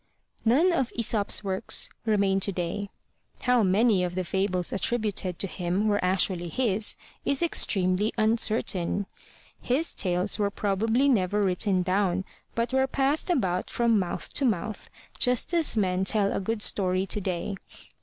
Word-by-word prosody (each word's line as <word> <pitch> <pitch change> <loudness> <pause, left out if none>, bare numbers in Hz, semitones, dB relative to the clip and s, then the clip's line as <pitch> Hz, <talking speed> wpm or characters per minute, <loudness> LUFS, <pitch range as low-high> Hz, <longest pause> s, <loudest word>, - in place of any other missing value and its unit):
None 300 +11 +3
of 265 -7 0
Aesop's 215 -3 +1
works 190 -1 0 0.2
remain 200 -3 +2
today. 195 +1 -3 0.5
How 250 -1 +3
many 200 0 +3
of 180 0 -3
the 185 - -1
fables 185 -1 -1
attributed 200 -4 -1
to - - 0
him 180 +3 -2
were 205 -2 +1
actually 180 -1 0
his 215 -2 +1 0.3
is 280 +3 +1
extremely 195 - +1
uncertain. 215 -4 +1 0.6
His 280 +7 0
tales 180 +3 0
were 205 -1 +1
probably 220 +6 0
never 205 -5 +1
written 185 0 +1
down 190 0 0 0.3
but 235 +2 -1
were 265 0 +2
passed 275 +6 0
about 185 - 0
from 235 -3 +2
mouth 180 -2 -4
to 285 - +1
mouth, 220 -3 -2 0.3
just 250 +6 +1
as 330 -8 +2
men 185 -2 +1
tell 200 0 +1
a - - -1
good 210 +2 -2
story 185 -1 +1
today. 195 -1 -3
200 Hz, 145 wpm, -26 LUFS, 185-230 Hz, 0.6 s, None